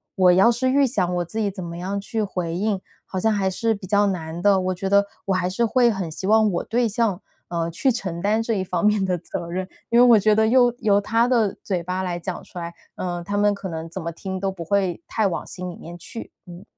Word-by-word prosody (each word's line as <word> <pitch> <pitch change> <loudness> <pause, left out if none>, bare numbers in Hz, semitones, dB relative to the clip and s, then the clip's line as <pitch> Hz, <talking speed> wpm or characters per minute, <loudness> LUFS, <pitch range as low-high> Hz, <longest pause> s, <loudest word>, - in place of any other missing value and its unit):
我 185 -2 +5
要 195 +6 +6
是 250 +2 0
预 280 +1 +4
想 180 -7 0
我 175 - 0
自 220 +6 -8
己 210 -2 +1
怎 185 -1 -7
么 170 0 -6
样 195 +3 -3
去 220 +2 -3
回 180 -4 -3
应， 200 0 -1 0.2
好 190 - -4
像 220 +4 +2
还 200 -2 0
是 225 +4 0
比 200 -2 -9
较 205 +1 +3
难 165 -3 -3
的。 200 0 +4
我 185 0 0
觉 190 +2 -4
得 200 0 +5 0.2
我 195 - +1
还 180 -1 0
是 235 +6 +1
会 240 +2 +4
很 190 -5 -3
希 190 - -6
望 215 0 +4
我 175 - -1
对 235 +1 +1
象， 215 -4 0 0.3
呃， 170 -1 -1
去 260 - +1
承 185 -8 -4
担 215 +3 +2
这 225 - -1
一 195 -3 0
方 180 +1 -1
面 210 -2 +3
的 180 -1 0
责 170 0 -6
任。 185 +1 -3 0.2
因 235 - +3
为 250 - +8
我 235 -3 +7
觉 210 +1 +3
得 220 - +4
又 245 +1 +5
由 205 -1 +3
他 230 +3 +2
的 230 -6 +2
嘴 185 -4 -1
巴 185 +2 -3
来 175 -2 -2
讲 175 +1 -5
出 180 - -9
来， 170 0 -6 0.2
呃， 175 -1 -3
他 205 +3 -4
们 205 0 +3
可 195 - -6
能 165 0 -5
怎 185 - -6
么 170 0 -4
听 190 +3 -5
都 195 0 -1
不 180 -3 -7
会 185 -1 0
太 220 - 0
往 185 - -3
心 180 0 -6
里 - - -10
面 170 +1 -10
去。 230 +6 -9
嗯。 175 0 -11
195 Hz, 285 characters per minute, -23 LUFS, 175-215 Hz, 0.3 s, 为